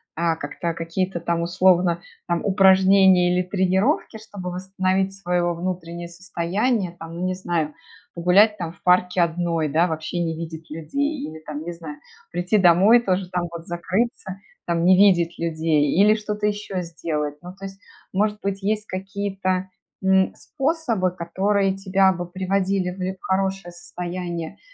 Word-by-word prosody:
а, 165 Hz, 0 st, +1 dB
как-то, 165 Hz, +3 st, -4 dB
какие-то 170 Hz, +2 st, -2 dB
там, 170 Hz, 0 st, -1 dB
условно, 175 Hz, -1 st, +3 dB, 0.3 s
там, 175 Hz, -1 st, 0 dB
упражнения 190 Hz, -2 st, +5 dB
или 180 Hz, 0 st, +1 dB
тренировки, 190 Hz, -, 0 dB
чтобы 205 Hz, -4 st, -7 dB
восстановить 190 Hz, +1 st, -1 dB
свое 180 Hz, -2 st, -1 dB
во 175 Hz, 0 st, +1 dB
внутреннее 170 Hz, -1 st, -5 dB
состояние, 185 Hz, +3 st, -2 dB
там, 165 Hz, 0 st, -8 dB
ну, 180 Hz, -, -1 dB
не 185 Hz, -, 0 dB
знаю, 170 Hz, -4 st, -2 dB, 0.4 s
погулять 195 Hz, +5 st, +4 dB
там 170 Hz, -4 st, -4 dB
в 170 Hz, -, -22 dB
парке 180 Hz, 0 st, +3 dB
одной, 170 Hz, -1 st, 0 dB
да, 160 Hz, +5 st, +2 dB
вообще 160 Hz, +1 st, -3 dB
не 165 Hz, -1 st, -2 dB
видеть 160 Hz, -1 st, -7 dB
людей 280 Hz, -, -2 dB
или 160 Hz, +1 st, -9 dB
там, 150 Hz, -1 st, -7 dB
не 175 Hz, +1 st, -5 dB
знаю, 160 Hz, -3 st, -9 dB, 0.3 s
прийти 175 Hz, +5 st, +1 dB
домой, 190 Hz, +6 st, +6 dB
тоже 185 Hz, -4 st, -1 dB
там 180 Hz, -1 st, -2 dB
вот 170 Hz, 0 st, -8 dB
закрыться, 190 Hz, +3 st, -2 dB, 0.3 s
там, 170 Hz, 0 st, 0 dB
не 185 Hz, +1 st, +7 dB
видеть 175 Hz, -4 st, +4 dB
людей, 160 Hz, -3 st, +1 dB
или 210 Hz, +2 st, +6 dB
что-то 210 Hz, -1 st, -3 dB
еще 205 Hz, -3 st, -3 dB
сделать. 155 Hz, -3 st, -3 dB
Ну 180 Hz, +1 st, -9 dB
то 195 Hz, +1 st, -10 dB
есть, 195 Hz, 0 st, -8 dB, 0.4 s
может 210 Hz, +2 st, +1 dB
быть, 195 Hz, 0 st, -3 dB
есть 215 Hz, +1 st, 0 dB
какие-то, 190 Hz, -1 st, -3 dB, 0.3 s
м, 190 Hz, 0 st, +3 dB
способы, 265 Hz, -, -1 dB
которые 190 Hz, +3 st, 0 dB
тебя 195 Hz, 0 st, +3 dB
бы 175 Hz, 0 st, -5 dB
приводили 190 Hz, +1 st, -1 dB
в 185 Hz, +1 st, -4 dB
хорошее 190 Hz, -2 st, -1 dB
состояние 175 Hz, -1 st, -6 dB
180 Hz, 155 wpm, -23 LUFS, 170-195 Hz, 0.4 s, не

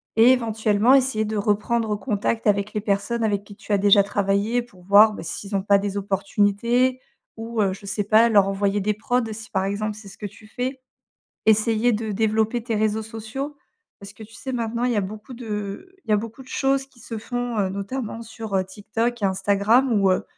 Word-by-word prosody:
et 230 Hz, +3 st, +7 dB
éventuellement 220 Hz, -1 st, +2 dB
essayer 260 Hz, -5 st, +3 dB
de 215 Hz, 0 st, -3 dB
reprendre 210 Hz, +2 st, 0 dB
contact 220 Hz, -1 st, -1 dB
avec 200 Hz, +1 st, +1 dB
les 210 Hz, -, -1 dB
personnes 215 Hz, +3 st, -1 dB
avec 205 Hz, -2 st, 0 dB
qui 205 Hz, 0 st, -13 dB
tu 210 Hz, -, -4 dB
as -, -, +4 dB
déjà 200 Hz, 0 st, +5 dB
travaillé 200 Hz, +4 st, 0 dB
pour 190 Hz, -7 st, -16 dB
voir, 205 Hz, +3 st, +7 dB
bah, 185 Hz, -, -7 dB
s'ils 195 Hz, +5 st, -6 dB
ont 190 Hz, -, -2 dB
pas 200 Hz, 0 st, +4 dB
des 200 Hz, 0 st, -3 dB
opportunités 205 Hz, +6 st, +1 dB, 0.3 s
ou 225 Hz, 0 st, -3 dB
heu, 190 Hz, -2 st, +1 dB
je 200 Hz, +1 st, -11 dB
sais 205 Hz, +1 st, -1 dB
pas, 220 Hz, +3 st, +5 dB
leur 200 Hz, -3 st, +5 dB
envoyer 195 Hz, +1 st, 0 dB
des 210 Hz, +2 st, 0 dB
prods 245 Hz, +4 st, 0 dB
si, 220 Hz, +2 st, -9 dB
par 190 Hz, -1 st, 0 dB
exemple, 210 Hz, +2 st, -2 dB
c'est 215 Hz, -, -12 dB
ce 195 Hz, -, -13 dB
que 210 Hz, -, -4 dB
tu 210 Hz, +2 st, -16 dB
fais. 255 Hz, +3 st, -4 dB, 0.7 s
Essayer 220 Hz, +2 st, +3 dB
de 220 Hz, -1 st, -2 dB
développer 220 Hz, +2 st, +1 dB
tes 230 Hz, -1 st, -3 dB
réseaux 215 Hz, 0 st, +1 dB
sociaux 225 Hz, +6 st, -6 dB, 0.4 s
parce 200 Hz, 0 st, -11 dB
que, 220 Hz, +1 st, -11 dB
tu 225 Hz, -, -15 dB
sais, 265 Hz, +4 st, -6 dB
maintenant, 235 Hz, 0 st, -1 dB
il 250 Hz, -, +1 dB
y -, -, -1 dB
a 205 Hz, -, +2 dB
beaucoup 210 Hz, +5 st, -7 dB
de 220 Hz, -, -6 dB
il -, -, -15 dB
y -, -, +4 dB
a -, -, +5 dB
beaucoup 230 Hz, +4 st, -6 dB
de 255 Hz, -, -20 dB
choses 270 Hz, 0 st, 0 dB
qui 260 Hz, -3 st, -23 dB
se 225 Hz, +1 st, -6 dB
font, 245 Hz, 0 st, -3 dB
heu, 195 Hz, -, +2 dB
notamment 215 Hz, +4 st, -4 dB
sur, 220 Hz, -2 st, -6 dB
heu, 190 Hz, -, +2 dB
TikTok 225 Hz, +4 st, -3 dB
et -, -, +2 dB
Instagram 200 Hz, +7 st, +2 dB
où, 195 Hz, -, +4 dB
heu -, -, +1 dB
215 Hz, 220 wpm, -23 LUFS, 200-235 Hz, 0.7 s, et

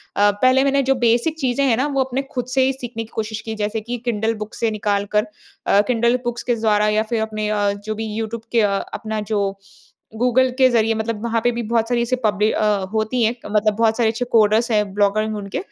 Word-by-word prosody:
अ, 205 Hz, 0 st, +4 dB
पहले 255 Hz, +1 st, +5 dB
मैंने 275 Hz, 0 st, +2 dB
जो 270 Hz, +1 st, +2 dB
बेसिक 245 Hz, +6 st, +1 dB
चीज़ें 265 Hz, -1 st, 0 dB
हैं 235 Hz, -4 st, +2 dB
ना 270 Hz, +4 st, +1 dB
वो 275 Hz, -2 st, +1 dB
अपने 260 Hz, +1 st, -3 dB
ख़ुद 250 Hz, -1 st, -1 dB
से 265 Hz, -, +3 dB
ही 265 Hz, -, +1 dB
सीखने 245 Hz, -3 st, -6 dB
की 220 Hz, -, -14 dB
कोशिश 215 Hz, 0 st, -3 dB
की। 220 Hz, 0 st, -6 dB
जैसे 215 Hz, +1 st, -2 dB
कि 240 Hz, +3 st, -4 dB
किंडल 225 Hz, -1 st, 0 dB
बुक 215 Hz, -, -6 dB
से 230 Hz, -1 st, -1 dB
निकाल 205 Hz, -1 st, -1 dB
कर 210 Hz, +1 st, +3 dB, 0.4 s
अ, 200 Hz, -, +4 dB
किंडल 235 Hz, 0 st, +2 dB
बुक्स 240 Hz, -1 st, -3 dB
के 240 Hz, -, 0 dB
द्वारा। 210 Hz, -2 st, +2 dB
या 215 Hz, +1 st, +2 dB
फ़िर 230 Hz, -2 st, +1 dB
अपने 215 Hz, -1 st, -3 dB
अ, 205 Hz, -1 st, +1 dB
जो 215 Hz, 0 st, -3 dB
भी 220 Hz, +1 st, -4 dB
यूट्यूब 225 Hz, +1 st, -4 dB
के 235 Hz, -, +3 dB
अ, 205 Hz, -, +3 dB, 0.2 s
अपना 220 Hz, 0 st, -4 dB
जो 210 Hz, -1 st, +1 dB, 0.8 s
गूगल 250 Hz, +2 st, +3 dB
के 260 Hz, -1 st, +6 dB
ज़रिए 225 Hz, -2 st, +2 dB
मतलब 220 Hz, 0 st, -3 dB
वहाँ 230 Hz, -1 st, 0 dB
पे 245 Hz, -, +3 dB
भी 240 Hz, -, -2 dB
बहुत 230 Hz, +1 st, 0 dB
सारी 240 Hz, -1 st, +1 dB
ऐसी 235 Hz, +2 st, 0 dB
पब्लि 210 Hz, 0 st, +2 dB
अ, -, -, -1 dB, 0.3 s
होती 220 Hz, +3 st, 0 dB
है। 225 Hz, +2 st, +1 dB
मतलब 210 Hz, 0 st, +1 dB
बहुत 225 Hz, 0 st, +2 dB
सारे 235 Hz, -2 st, +3 dB
अच्छे 225 Hz, +2 st, -2 dB
कोडर्स 220 Hz, +1 st, +3 dB
हैं 210 Hz, -1 st, +3 dB
ब्लॉगर 205 Hz, +1 st, +1 dB
में 215 Hz, -, -3 dB
उनके। 200 Hz, -1 st, -5 dB
225 Hz, 240 wpm, -20 LUFS, 215-245 Hz, 0.8 s, के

